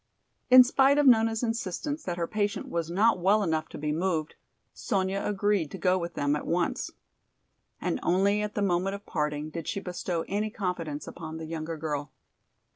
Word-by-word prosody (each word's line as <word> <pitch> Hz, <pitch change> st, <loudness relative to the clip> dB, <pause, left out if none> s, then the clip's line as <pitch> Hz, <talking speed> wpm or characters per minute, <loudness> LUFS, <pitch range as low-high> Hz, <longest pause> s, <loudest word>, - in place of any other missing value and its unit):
In 255 Hz, 0 st, +10 dB
spite 270 Hz, +3 st, +4 dB
of 295 Hz, -, +4 dB
Nona's 225 Hz, -2 st, +4 dB
insistence 230 Hz, -, -2 dB
that 175 Hz, -2 st, -3 dB
her 170 Hz, -, 0 dB
patient 205 Hz, +1 st, -2 dB
was 170 Hz, -1 st, -2 dB
not 200 Hz, +4 st, +3 dB
well 200 Hz, +4 st, +3 dB
enough 160 Hz, -3 st, -1 dB
to -, -, -8 dB
be 150 Hz, 0 st, -2 dB
moved, 160 Hz, -1 st, -1 dB, 0.4 s
Sonya 195 Hz, 0 st, -1 dB
agreed 205 Hz, -5 st, +1 dB
to -, -, -7 dB
go 185 Hz, -1 st, +2 dB
with 170 Hz, 0 st, -5 dB
them 145 Hz, +1 st, +1 dB
at 150 Hz, -, -5 dB
once. 170 Hz, 0 st, 0 dB, 0.9 s
And 80 Hz, -, -1 dB
only 200 Hz, +4 st, +2 dB
at 210 Hz, 0 st, -4 dB
the 205 Hz, -, 0 dB
moment 190 Hz, +1 st, +1 dB
of 200 Hz, -, -11 dB
parting 150 Hz, -1 st, -2 dB
did 165 Hz, 0 st, -6 dB
she 200 Hz, -, -2 dB
bestow 180 Hz, -2 st, -3 dB
any 210 Hz, +2 st, -1 dB
confidence 175 Hz, -8 st, -4 dB
upon 160 Hz, -2 st, -7 dB
the 160 Hz, -, -6 dB
younger 160 Hz, 0 st, -5 dB
girl. 150 Hz, -2 st, -3 dB
180 Hz, 185 wpm, -28 LUFS, 160-205 Hz, 0.9 s, In